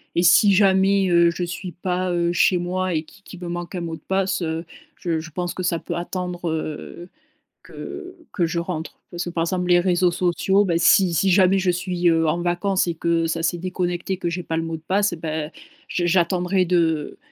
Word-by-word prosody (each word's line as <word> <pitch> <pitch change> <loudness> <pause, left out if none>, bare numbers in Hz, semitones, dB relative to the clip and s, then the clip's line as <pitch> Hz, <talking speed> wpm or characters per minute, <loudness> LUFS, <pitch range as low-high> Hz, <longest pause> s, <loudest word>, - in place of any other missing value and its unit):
Et 170 - +2
si 200 +3 +6
jamais, 195 0 +4
heu, 170 -1 +5
je 175 - -4
suis 180 +1 -5
pas, 180 +1 -2
heu, 170 0 +1
chez 180 +1 +3
moi 180 +1 -2
et 155 0 -1
qui 195 +5 -20
qui 185 - -11
me 180 - -7
manque 175 +1 -5
un 175 - -3
mot 165 -1 -4
de - - -15
passe, 190 0 -1
heu, 165 0 -3 0.3
je 170 -8 -2
je 160 0 -9
pense 175 +3 -3
que 185 - -5
ça 170 -2 0
peut - - -5
attendre, 175 -1 -4
heu, 160 +2 -5 0.5
que 365 0 -9 0.2
que 175 -3 +1
je 170 +1 -3
rentre. 170 -2 -5
Parce 175 +1 -4
que, 175 - -5
par 165 -1 -1
exemple, 180 +1 -1
les 175 0 +5
réseaux 180 0 +2
sociaux, 185 +3 +1
bah, 175 -3 0
si 180 0 +5
si 190 +5 +2
jamais 190 +1 +4
je 185 -1 +1
suis, 180 0 0
heu, 165 -1 +3
en 170 +3 0
vacances 180 +2 0
et 170 - -2
que 165 0 0
ça 165 0 -2
s'est 175 +1 0
déconnecté 180 +1 -2
que 175 - -2
j'ai 180 +1 -4
pas 160 - -3
le 165 - 0
mot 165 0 -4
de 160 - -15
passe, 200 -1 +1
bah, 155 -2 -4 0.4
je 175 -1 -1
j'attendrai 180 +1 +2
de 165 -4 0
175 Hz, 220 wpm, -22 LUFS, 170-185 Hz, 0.5 s, si